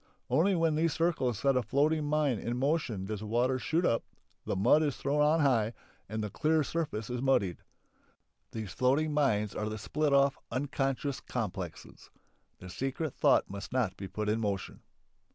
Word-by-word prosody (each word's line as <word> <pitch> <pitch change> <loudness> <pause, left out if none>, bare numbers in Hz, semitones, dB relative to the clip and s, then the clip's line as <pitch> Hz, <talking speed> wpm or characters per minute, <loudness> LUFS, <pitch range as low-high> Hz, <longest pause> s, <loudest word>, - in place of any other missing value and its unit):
Only 190 +5 +3
when 165 -2 +2
these 160 0 +1
circles 150 - 0
set 135 +3 +2
a 125 - +3
floating 150 +7 +1
mine 145 -6 +1
in 120 +4 -3
motion 130 - 0
does 105 +1 -4
the 110 - -7
water 125 +4 +1
shoot 165 +6 0
up, 115 - +2 0.4
the - - -1
mud 120 +11 +4
is 145 -4 0
thrown 145 +2 0
on 155 +2 +4
high, 120 -6 +2 0.4
and 110 0 -3
the 105 - -4
clear 155 +5 +2
surface 145 -9 -3
is 125 0 -2
muddied. 100 -10 +1 0.9
These 110 -4 -6
floating 145 +5 +2
mines 105 -9 +1
are 105 0 -3
the 110 - -4
split 150 +8 -1
off, 140 0 +3
unconscious 135 +1 -2
complexes. 95 -8 -6 0.5
The 90 0 -10
secret 135 - -3
thought - - +3
must 100 0 -7
not 120 -7 0
be 95 - -7
put 105 +2 -4
in 110 +2 +1
motion. 100 -3 -3
130 Hz, 175 wpm, -31 LUFS, 110-150 Hz, 0.9 s, mud